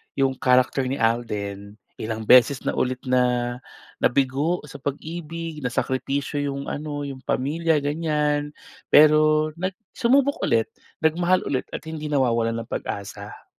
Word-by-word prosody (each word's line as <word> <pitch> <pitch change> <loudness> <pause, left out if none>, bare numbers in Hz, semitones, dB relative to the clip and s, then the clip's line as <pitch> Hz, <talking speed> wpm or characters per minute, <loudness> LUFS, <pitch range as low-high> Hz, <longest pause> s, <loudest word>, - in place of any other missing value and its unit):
'yung 135 -1 +1
character 130 +1 +3
ni 130 +2 -1
Alden 105 -3 -2 0.3
ilang 110 0 -4
beses 125 +3 +6
na - - 0
ulit 130 0 0
na-nabigo 130 +4 0
sa 140 - -11
pag-ibig, 160 +2 -5
na 125 - -1
sakripisyo 135 +3 -2
'yong 140 -1 -3
ano 145 -1 -4
'yong 135 -2 -7
pamilya 155 +5 0
ganyan, 150 0 0 0.4
pero 155 0 +5
nag 185 +3 -4 0.2
sumubok 275 +3 +2
ulit, 115 -1 +2 0.4
nagmahal 175 +3 +2
ulit 130 -2 -2
at - - -7
hindi 155 -1 -5
nawawalan 115 -5 +1
ng - - -33
pag-asa. 100 -1 -6
140 Hz, 130 wpm, -24 LUFS, 125-155 Hz, 0.4 s, beses